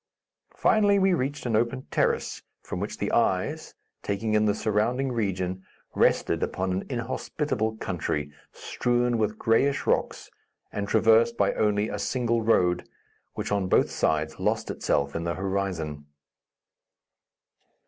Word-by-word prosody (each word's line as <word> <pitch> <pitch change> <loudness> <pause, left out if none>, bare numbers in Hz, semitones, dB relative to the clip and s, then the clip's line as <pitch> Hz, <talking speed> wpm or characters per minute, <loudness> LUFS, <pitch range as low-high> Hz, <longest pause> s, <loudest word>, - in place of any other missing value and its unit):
Finally 205 -2 +4
we 190 -1 +3
reached 145 -3 -2
an 115 -3 0
open 120 +4 0
terrace, - - 0 0.2
from - - -5
which - - -4
the - - -2
eyes, - - 0 0.3
taking 105 +2 -2
in 105 0 +3
the 105 -1 +2
surrounding 120 +6 0
region, 95 -5 -2 0.3
rested - - +2
upon 95 0 -1
an 95 +1 -1
inhospitable 115 -2 -2
country, 75 -7 -3 0.2
strewn 120 -1 0
with 105 0 0
grayish 135 +6 +2
rocks - - -1 0.4
and 100 -1 -3
traversed 115 +2 +4
by 100 - +2
only 105 0 +1
a 105 - -4
single 115 +1 0
road, 90 -6 +2 0.5
which - - -4
on 100 -2 +1
both - - +3
sides 80 0 0
lost - - 0
itself 70 -1 -1
in 85 - -2
the 85 0 -2
horizon. 95 -7 -3
105 Hz, 135 wpm, -26 LUFS, 95-120 Hz, 0.5 s, Finally